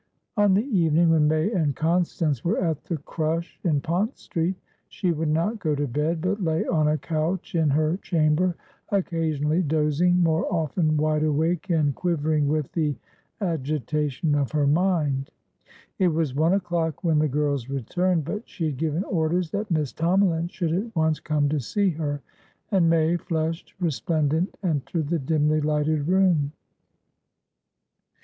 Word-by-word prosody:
On 205 -3 +4
the 210 +5 +2
evening 170 - +3
when 155 -2 +4
May 155 +6 +1
and 155 - 0
Constance 165 -4 0
were 175 +6 +1
at 165 -5 -1
the 170 - -2
crush 160 +3 -3
in 150 -5 +1
Pont 185 - -1
Street, 170 +3 -2 0.3
she 185 -4 -1
would 160 0 -1
not 170 +9 0
go 155 -6 0
to 145 +1 -1
bed, 150 +5 -1
but 200 +4 -1
lay 160 -1 0
on 155 -3 +2
a 150 +1 +2
couch 165 +4 -2
in 160 -3 +2
her 155 +4 +1
chamber, 170 0 +1 0.3
occasionally 165 -5 0
dozing, 160 +3 +2
more 165 +3 +1
often 155 -1 +1
wide 155 0 +1
awake 160 +5 0
and 155 -4 +2
quivering 155 -2 0
with 150 -1 -1
the 150 -4 0 0.5
agitation 150 - -1
of 145 -1 0
her 150 -2 +2
mind. 150 -4 +1 0.7
It 185 - +4
was 160 -5 0
one 160 +5 +2
o'clock 170 -4 -1
when 160 -3 +3
the 155 - +3
girls 140 -3 -1
returned, 165 +5 0
but 210 +8 -5
she 165 - -4
had 150 -4 -2
given 160 +4 -1
orders 170 -2 0
that 205 +1 -3
Miss 155 -6 0
Tomalin 170 0 +2
should 170 -3 -2
at 205 +4 -3
once 160 -2 +1
come 150 -2 0
to 150 0 0
see 195 - 0
her, 145 -3 -3 0.5
and 180 -5 +3
May, 165 +1 +3
flushed, 165 -1 -3
resplendent, 160 0 0
entered 155 -2 -1
the 170 -1 +1
dimly 150 +1 +1
lighted 150 0 0
room. 175 -6 +2
160 Hz, 155 wpm, -25 LUFS, 150-175 Hz, 0.7 s, On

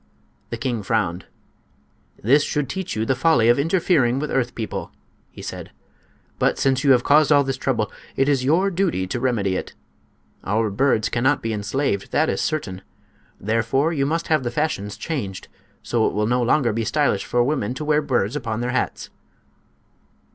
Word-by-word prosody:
The 115 - -4
king 120 -2 -2
frowned. 95 -5 -1 1.0
"This 135 +8 +5
should 150 -2 -1
teach 190 -2 -4
you 110 +1 -1
the 130 - +2
folly 130 -4 +3
of 120 - +4
interfering 155 -6 +2
with 150 +2 -3
earth 125 -2 -1
people," 110 -2 -5 0.4
he - - -12
said. - - -7 0.7
"But - - +2
since 130 -1 +1
you 140 - +3
have 120 -1 +2
caused 150 +1 +4
all 145 -1 +6
this 135 -1 -2
trouble, 130 - -1 0.2
it 135 - +2
is 140 -3 +2
your 175 +9 +2
duty 175 - 0
to 105 +6 -3
remedy 110 -7 0
it. - - -5 0.7
Our 105 +2 0
birds 110 -1 +2
cannot 130 +5 +1
be 115 0 -1
enslaved, 105 0 -2
that 155 +2 +2
is - - -1
certain; 100 -12 -3 0.6
therefore 115 - 0
you 140 -3 0
must 165 +2 -1
have 155 -3 +3
the 120 - -2
fashions 120 -7 -2
changed, 120 - -5 0.3
so 115 -2 +1
it - - -2
will 105 0 0
no 125 +3 +1
longer 120 -1 +2
be 115 +1 -1
stylish 140 -5 +1
for 120 0 +1
women 125 -4 -1
to 150 - -5
wear 150 0 +2
birds 125 -5 0
upon 115 -5 -3
their 125 +1 -1
hats." 130 - -2
130 Hz, 180 wpm, -22 LUFS, 110-150 Hz, 1.0 s, all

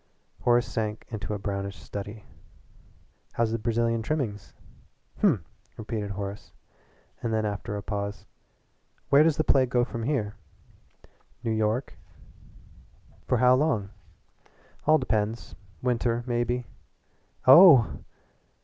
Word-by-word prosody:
Horace 120 0 +3
sank 110 -1 -4
into 105 -1 -4
a - - -3
brownish 100 -1 -4
study. 105 +1 -8 1.1
"How's 115 -1 0
the 115 - -1
Brazilian 115 0 0
trimmings?" 115 -7 -3 0.6
"Hm!" - - +2 0.3
repeated 105 -1 -4
Horace, 100 +1 -6 0.7
and 115 - -2
then 110 -1 0
after 105 0 -4
a 100 - -6
pause: 100 0 -4 0.8
"Where 140 +1 +6
does 155 -1 +3
the 155 - +2
play 130 -4 +3
go 120 0 +1
from 115 -1 -6
here?" 115 -5 -1 1.1
"New 115 - -1
York." 110 +4 -1 1.3
"For - - +2
how 125 0 +5
long?" 130 -8 +1 1.0
"All 155 0 +6
depends. 110 -3 -2 0.3
Winter 120 -1 0
maybe." 120 0 -1 0.8
"Oh!" 135 - +8
115 Hz, 115 wpm, -27 LUFS, 105-125 Hz, 1.3 s, Oh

